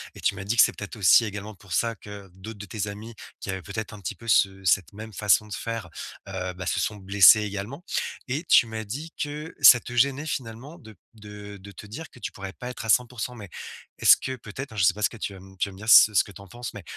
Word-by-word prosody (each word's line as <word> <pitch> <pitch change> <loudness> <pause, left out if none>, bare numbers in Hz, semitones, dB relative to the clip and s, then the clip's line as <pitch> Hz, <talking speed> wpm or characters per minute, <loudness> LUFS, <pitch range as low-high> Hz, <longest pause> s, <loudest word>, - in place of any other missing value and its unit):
et - - -11
tu 100 - +1
m'as 95 0 -7
dit 110 +4 -1
que 110 - +7
c'est - - +2
peut-être 100 +3 -8
aussi 105 +2 +5
également 105 0 -7
pour 95 -1 -11
ça 115 +3 +1
que 100 -1 -11
d'autres 105 +3 -10
de 105 - -7
tes 105 +1 -4
amis, 105 +3 -8 0.3
qui - - -7
avaient 95 -1 -3
peut-être 105 +3 -6
un 105 - -10
petit 90 - -5
peu 115 -1 -10
ce 95 -1 +3
cette 95 -1 +1
même 110 +2 -9
façon 105 +2 +2
de 105 - -9
faire, 115 -5 -5 0.4
heu, 95 -1 -4
bah 90 0 -8
ce - - -1
sont 105 - -1
blessés 100 +1 +6
également. 105 - -6 0.5
Et 145 +7 -2
tu - - +6
m'as 110 -1 -6
dit 145 +10 -6
que 150 +3 -5
ça 125 -2 +8
te 120 - -9
gênait 140 +4 +1
finalement 135 +3 -6
de 110 -5 -14
p 90 - -31 0.2
de 105 -1 -10
de 100 +1 -12
te - - -11
dire 145 +11 -9
que - - -17
tu - - -5
pourrais 95 -1 -8
pas 125 - -8
être 125 -2 -7
à - - -6
100%, 125 +1 +1
mais 100 -5 -10 0.5
est-ce - - +8
que 130 - -5
peut-être 120 +5 -8
hein, - - -11
je 95 - +2
sais 90 0 +5
pas 105 - -9
ce - - +3
que 115 - -12
tu 100 - -5
vas 95 - -12 0.2
tu 100 - 0
vas 95 - -12
me - - -14
dire 110 +3 -6
ce 110 -1 +8
ce 100 - +4
que 100 - -13
tu 100 - -13
en 100 - -13
penses, 120 +5 -8
mais 105 - -8
105 Hz, 280 wpm, -25 LUFS, 100-115 Hz, 0.5 s, ça